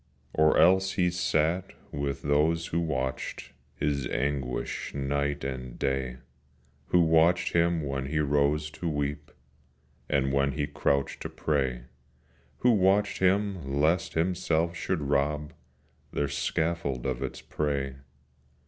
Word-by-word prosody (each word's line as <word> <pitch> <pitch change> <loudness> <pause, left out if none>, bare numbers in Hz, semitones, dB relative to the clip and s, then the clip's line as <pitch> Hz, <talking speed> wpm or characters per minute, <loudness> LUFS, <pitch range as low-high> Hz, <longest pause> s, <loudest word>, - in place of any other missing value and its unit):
Or 80 0 +4
else 95 +3 +5
he 90 -1 +2
sat 90 0 0 0.2
with 70 -1 -3
those 80 +3 +2
who 85 - -1
watched 65 -6 -3 0.2
His 70 -2 -1
anguish 65 -2 -2
night 70 +1 -1
and 65 -2 -5
day; 65 -2 -1 0.7
Who 90 - +4
watched 80 +2 +3
him 85 -1 +2
when 70 -1 -3
he 75 +3 -2
rose 75 +1 +1
to 85 +1 -4
weep, 75 -1 -3 0.8
And 65 -1 +1
when 70 0 +2
he 75 0 -1
crouched 70 -2 -1
to - - -4
pray; 65 -5 -1 0.8
Who 125 - +5
watched 100 -1 +3
him 95 -7 +1
lest 80 +4 +2
himself 85 -1 +1
should 85 0 -2
rob 75 +1 0 0.6
Their 70 - -1
scaffold 70 -3 -1
of 65 -1 -2
its 65 - -4
prey. 70 -3 -2
75 Hz, 125 wpm, -28 LUFS, 70-85 Hz, 0.8 s, else